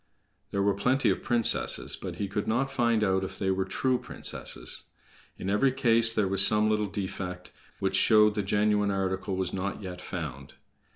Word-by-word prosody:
There 100 0 -1
were 100 0 +2
plenty 125 +7 +1
of - - -2
princesses, 120 -2 +2
but - - -7
he 100 - -3
could 100 +1 -3
not 130 +5 0
find 115 -2 +1
out 95 -1 +1
if 95 - -6
they 95 -1 0
were 95 0 -1
true 130 -1 0
princesses. - - -4 0.5
In - - -6
every 105 +7 +2
case 115 -3 +4
there 105 -3 +1
was 95 +1 +3
some 105 +1 +3
little 105 -1 0
defect, 95 -2 -5 0.3
which - - 0
showed 105 -1 +5
the 105 - -1
genuine 105 +1 +1
article 95 0 -2
was 95 0 -2
not 100 +2 -4
yet 90 -1 -7
found. 70 -8 -7
100 Hz, 180 wpm, -28 LUFS, 95-110 Hz, 0.5 s, showed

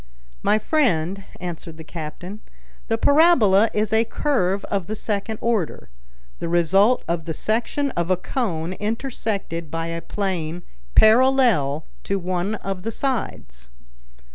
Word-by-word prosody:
"My 215 - +3
friend," 200 - 0
answered 170 -2 -7
the 160 - -9
captain, 175 +6 -7 0.5
"the 225 - +1
parabola 230 - +5
is 215 0 -1
a 220 +1 +4
curve 200 -6 0
of 195 -4 -2
the 215 - -3
second 215 0 -3
order, 225 -8 -1 0.5
the - - -3
result 190 +8 +3
of 170 -1 -2
the 160 - -4
section 240 - 0
of 170 -4 -2
a 185 - +3
cone 180 -6 -2
intersected 210 - -3
by 165 +1 -3
a 165 0 -4
plane 175 -3 -3 0.3
parallel 220 - +4 0.2
to 200 - 0
one 185 +2 -2
of 195 -3 -5
the 225 +4 -3
sides." 65 - -4
195 Hz, 135 wpm, -22 LUFS, 170-225 Hz, 0.5 s, parabola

